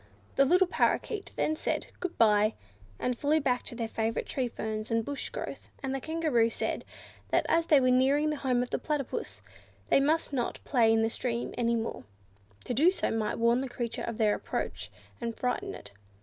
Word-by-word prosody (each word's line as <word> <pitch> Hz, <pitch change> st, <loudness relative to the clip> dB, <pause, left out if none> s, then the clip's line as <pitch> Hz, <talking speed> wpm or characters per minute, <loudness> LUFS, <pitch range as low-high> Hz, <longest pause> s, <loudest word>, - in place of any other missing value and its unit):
The 275 Hz, -, +5 dB
little 360 Hz, +6 st, +5 dB
Parrakeets 395 Hz, +3 st, 0 dB
then 310 Hz, -, 0 dB
said -, -, -2 dB
"Good 365 Hz, -2 st, -4 dB
bye," 215 Hz, -1 st, +4 dB, 0.4 s
and 250 Hz, -, -1 dB
flew 295 Hz, +5 st, +2 dB
back 250 Hz, -4 st, +1 dB
to -, -, -5 dB
their 230 Hz, -1 st, -2 dB
favourite 225 Hz, +1 st, -1 dB
tree 260 Hz, -2 st, -1 dB
ferns 220 Hz, -2 st, -4 dB
and 225 Hz, -1 st, +1 dB
bush 285 Hz, -1 st, -4 dB
growth; -, -, -6 dB
and 270 Hz, 0 st, -1 dB
the 270 Hz, -, -2 dB
Kangaroo 310 Hz, -8 st, +2 dB
said, -, -, -2 dB, 0.4 s
that -, -, +2 dB
as 330 Hz, 0 st, +2 dB
they 295 Hz, -, +6 dB
were 255 Hz, -1 st, +3 dB
nearing 275 Hz, +4 st, +3 dB
the 300 Hz, -, -2 dB
home 250 Hz, -3 st, +1 dB
of 250 Hz, -, -8 dB
the -, -, 0 dB
Platypus, 255 Hz, -, -3 dB, 0.5 s
they -, -, +5 dB
must 300 Hz, +2 st, +1 dB
not 245 Hz, -3 st, -1 dB
play 235 Hz, -4 st, +3 dB
in 225 Hz, 0 st, +3 dB
the 225 Hz, -, +2 dB
stream 240 Hz, 0 st, -3 dB
any 235 Hz, -1 st, +1 dB
more; 225 Hz, 0 st, -3 dB, 0.6 s
to -, -, -2 dB
do 300 Hz, +9 st, +5 dB
so 380 Hz, -, -1 dB
might 220 Hz, -1 st, -1 dB
warn 235 Hz, +2 st, +3 dB
the 270 Hz, -, -4 dB
creature 240 Hz, -1 st, -4 dB
of 230 Hz, -2 st, -4 dB
their 215 Hz, -2 st, +3 dB
approach -, -, -4 dB, 0.3 s
and 230 Hz, -1 st, -3 dB
frighten 250 Hz, -1 st, -2 dB
it. -, -, -11 dB
250 Hz, 200 wpm, -29 LUFS, 230-285 Hz, 0.6 s, they